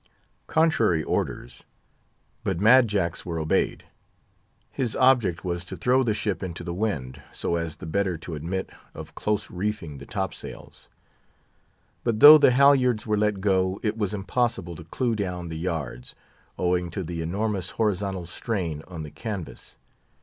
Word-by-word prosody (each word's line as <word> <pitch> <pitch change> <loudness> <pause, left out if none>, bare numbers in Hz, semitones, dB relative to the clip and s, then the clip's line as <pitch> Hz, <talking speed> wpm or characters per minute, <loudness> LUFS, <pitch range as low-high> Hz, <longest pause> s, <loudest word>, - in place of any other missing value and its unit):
Contrary 115 - +2
orders! 60 -3 -3 0.8
but - - -1
Mad 120 +4 +6
Jack's 95 -5 -1
were 85 -2 -4
obeyed. 80 -1 0 0.9
His 125 -5 -2
object 120 -10 +3
was 85 -1 -2
to - - -7
throw 125 +2 +3
the 115 -5 +1
ship 100 -5 -2
into 85 -2 -5
the 85 0 -4
wind, 70 -10 -3
so 85 - -2
as 85 -2 -3
the - - -10
better 95 +1 0
to 85 +1 -8
admit 85 +5 -4 0.2
of - - -9
close 105 -1 -2
reefing 90 -6 -4
the 70 - -11
top 95 -3 -2
sails. - - -11 1.1
But 115 -3 0
though 150 +4 +11
the - - +6
halyards 125 -3 +4
were 105 - +1
let 105 -2 0
go, 95 -1 +1
it 110 -1 0
was 105 -4 -1
impossible 100 -3 -1
to 80 - -10
clew 120 +7 -1
down 90 -4 -3
the 80 -1 -5
yards, 80 -8 -4 0.4
owing 90 -1 0
to 95 +3 -4
the 85 0 -4
enormous 95 +2 -2
horizontal 100 -4 -1
strain 85 -4 -3
on 85 -3 -7
the 75 - -8
canvas. 105 -8 -7
95 Hz, 155 wpm, -25 LUFS, 85-110 Hz, 1.1 s, though